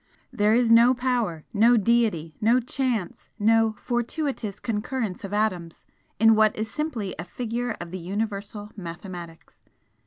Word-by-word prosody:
There 210 Hz, +1 st, +3 dB
is 240 Hz, -1 st, +3 dB
no 235 Hz, +3 st, +7 dB
power, 240 Hz, -11 st, -1 dB
no 230 Hz, +3 st, +5 dB
deity, 210 Hz, -8 st, +1 dB
no 230 Hz, +4 st, +4 dB
chance, 245 Hz, -6 st, -3 dB
no 225 Hz, 0 st, +3 dB
'fortuitous 240 Hz, -, -3 dB
concurrence 225 Hz, -2 st, -3 dB
of 195 Hz, -, -6 dB
atoms' 185 Hz, -6 st, -2 dB, 0.3 s
in 225 Hz, +1 st, +7 dB
what 215 Hz, -1 st, +4 dB
is 220 Hz, 0 st, -4 dB
simply 240 Hz, -9 st, -3 dB
a -, -, -3 dB
figure 235 Hz, +5 st, -4 dB
of 175 Hz, -1 st, -7 dB
the 185 Hz, -, -5 dB
Universal 205 Hz, +2 st, -4 dB
Mathematics. 175 Hz, -2 st, -9 dB
220 Hz, 135 wpm, -25 LUFS, 195-240 Hz, 0.3 s, no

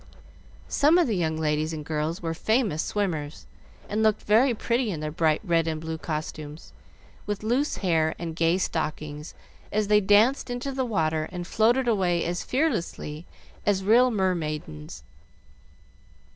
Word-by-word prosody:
Some 300 Hz, +4 st, +4 dB
of 350 Hz, -, +4 dB
the 225 Hz, -, 0 dB
young 160 Hz, -3 st, 0 dB
ladies 155 Hz, 0 st, 0 dB
and 150 Hz, -2 st, -6 dB
girls 155 Hz, +3 st, -2 dB
were 165 Hz, -1 st, -1 dB
famous 220 Hz, -3 st, +1 dB
swimmers, 160 Hz, -8 st, -3 dB, 0.4 s
and 210 Hz, +2 st, -1 dB
looked 215 Hz, -1 st, +2 dB
very 230 Hz, +6 st, +4 dB
pretty 235 Hz, +1 st, 0 dB
in 170 Hz, -6 st, -3 dB
their 155 Hz, 0 st, -3 dB
bright 155 Hz, -1 st, +1 dB
red 165 Hz, -4 st, +1 dB
and 160 Hz, -1 st, -2 dB
blue 160 Hz, 0 st, -5 dB
costumes, 155 Hz, -1 st, -6 dB, 0.5 s
with 205 Hz, 0 st, -3 dB
loose 250 Hz, +7 st, 0 dB
hair 160 Hz, -3 st, +2 dB
and 165 Hz, -2 st, -5 dB
gay 165 Hz, +2 st, +2 dB
stockings, 155 Hz, -3 st, -3 dB, 0.4 s
as 210 Hz, 0 st, 0 dB
they 210 Hz, 0 st, +5 dB
danced 215 Hz, +8 st, +4 dB
into 245 Hz, +3 st, -3 dB
the 260 Hz, -1 st, -1 dB
water 160 Hz, -8 st, 0 dB
and 175 Hz, -1 st, -5 dB
floated 235 Hz, +7 st, +2 dB
away 185 Hz, -6 st, +1 dB
as 175 Hz, +1 st, -2 dB
fearlessly 195 Hz, -, -2 dB, 0.4 s
as 195 Hz, -2 st, +1 dB
real 240 Hz, +5 st, +5 dB
mermaidens. 155 Hz, -, -3 dB
175 Hz, 150 wpm, -26 LUFS, 155-220 Hz, 0.5 s, they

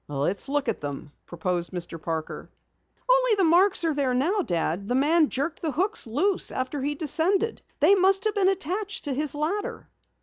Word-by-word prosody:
"Let's 145 Hz, -, -1 dB
look 285 Hz, -1 st, -1 dB
at -, -, -2 dB
them," 145 Hz, 0 st, -6 dB, 0.2 s
proposed 175 Hz, 0 st, -3 dB
Mr. 170 Hz, -3 st, -6 dB
Parker. 160 Hz, -1 st, -5 dB, 0.6 s
"Only -, -, +4 dB
the 390 Hz, -, +1 dB
marks 360 Hz, +3 st, +4 dB
are 325 Hz, -2 st, +1 dB
there 270 Hz, -3 st, 0 dB
now, 350 Hz, +11 st, +1 dB
Dad. 175 Hz, -, -2 dB
The 245 Hz, -, -1 dB
man 305 Hz, +3 st, +3 dB
jerked 295 Hz, +7 st, -3 dB
the 315 Hz, -5 st, -2 dB
hooks 380 Hz, -, 0 dB
loose 365 Hz, -, 0 dB
after 260 Hz, +2 st, -3 dB
he 290 Hz, +2 st, -2 dB
descended. 355 Hz, +9 st, +1 dB, 0.2 s
They -, -, +6 dB
must 390 Hz, 0 st, +4 dB
have 430 Hz, -1 st, +1 dB
been 390 Hz, -2 st, +2 dB
attached 390 Hz, +2 st, -3 dB
to 285 Hz, -, -2 dB
his 295 Hz, +2 st, 0 dB
ladder." 335 Hz, +8 st, -3 dB
300 Hz, 180 wpm, -25 LUFS, 240-385 Hz, 0.6 s, They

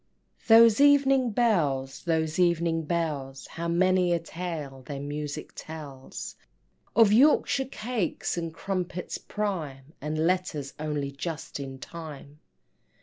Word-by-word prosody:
Those 230 Hz, +1 st, +7 dB
evening 275 Hz, -3 st, +5 dB
bells, 150 Hz, -, +1 dB
those 160 Hz, -1 st, 0 dB
evening 170 Hz, -2 st, +2 dB
bells, 150 Hz, -5 st, -2 dB
How 170 Hz, 0 st, -5 dB
many 180 Hz, +1 st, +3 dB
a 170 Hz, -, +1 dB
tale 160 Hz, -5 st, -6 dB
their 135 Hz, +2 st, -6 dB
music 145 Hz, +1 st, -5 dB
tells, 145 Hz, -4 st, -8 dB, 0.6 s
Of 220 Hz, -2 st, +6 dB
Yorkshire 270 Hz, +2 st, +4 dB
cakes 235 Hz, -7 st, -2 dB
and 165 Hz, -1 st, -3 dB
crumpets 180 Hz, +1 st, -4 dB
prime, 155 Hz, -9 st, -4 dB
And 150 Hz, +2 st, -3 dB
letters 165 Hz, -6 st, -1 dB
only 150 Hz, -2 st, -2 dB
just 155 Hz, +2 st, -5 dB
in 135 Hz, -1 st, -6 dB
time! 150 Hz, -1 st, -9 dB
165 Hz, 115 wpm, -27 LUFS, 145-185 Hz, 0.6 s, Those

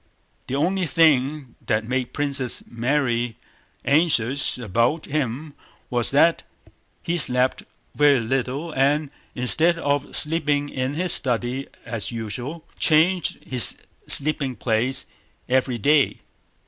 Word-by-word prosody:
The 130 Hz, -, -3 dB
only 180 Hz, +5 st, 0 dB
thing 145 Hz, -3 st, +2 dB
that 110 Hz, -1 st, -1 dB
made 125 Hz, 0 st, -2 dB
Princess 140 Hz, -3 st, 0 dB
Mary 120 Hz, -1 st, -1 dB, 0.5 s
anxious 140 Hz, -4 st, +1 dB
about 120 Hz, -, 0 dB
him 145 Hz, 0 st, -3 dB, 0.4 s
was 120 Hz, -1 st, +1 dB
that 165 Hz, +4 st, +3 dB, 0.6 s
he 170 Hz, +1 st, -1 dB
slept 125 Hz, -3 st, +1 dB, 0.3 s
very 145 Hz, -2 st, +4 dB
little 130 Hz, +7 st, -2 dB
and, 145 Hz, +1 st, +1 dB, 0.2 s
instead 160 Hz, +7 st, +2 dB
of 145 Hz, -3 st, -2 dB
sleeping 150 Hz, -2 st, +1 dB
in 130 Hz, +1 st, -3 dB
his 180 Hz, +2 st, +2 dB
study 125 Hz, +1 st, 0 dB, 0.2 s
as 115 Hz, -2 st, -5 dB
usual, 120 Hz, +8 st, -5 dB
changed 165 Hz, +3 st, +2 dB
his 125 Hz, -3 st, +3 dB, 0.3 s
sleeping 140 Hz, -3 st, +2 dB
place 115 Hz, +4 st, -1 dB, 0.4 s
every 130 Hz, -1 st, +1 dB
day. 145 Hz, +5 st, +2 dB
135 Hz, 110 wpm, -23 LUFS, 125-150 Hz, 0.6 s, very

